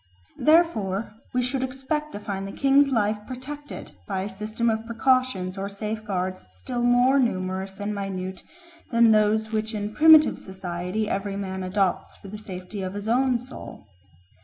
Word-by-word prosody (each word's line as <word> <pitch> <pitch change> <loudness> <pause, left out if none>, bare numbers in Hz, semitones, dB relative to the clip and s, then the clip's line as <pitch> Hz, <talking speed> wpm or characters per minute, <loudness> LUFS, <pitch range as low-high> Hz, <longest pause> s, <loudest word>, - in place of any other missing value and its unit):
Therefore 230 - +3 0.2
we 250 0 +1
should 255 +1 -1
expect 270 +4 -3
to 205 - -5
find 195 -2 -4
the - - -6
king's 275 +3 +4
life 215 -4 +1
protected 285 +3 -7 0.2
by 190 -2 -1
a 195 - -3
system 215 +4 -3
of 220 0 0
precautions 230 -6 +1
or 195 +1 -3
safeguards 200 - -3
still 90 - -4
more 245 +3 +4
numerous 190 -4 -1
and 205 +1 -2
minute 190 -2 -4 0.5
than 230 -1 +5
those 215 +1 +3
which 220 0 -1
in 210 0 -3
primitive 315 +1 +7
society 185 +2 -4
every 195 -1 -2
man 190 -1 -4
adopts 185 0 0
for 195 - -12
the 210 +2 -7
safety 190 0 -7
of 185 +1 -4
his 205 +1 -5
own 250 +2 +3
soul. 250 - -10
215 Hz, 160 wpm, -25 LUFS, 195-250 Hz, 0.5 s, primitive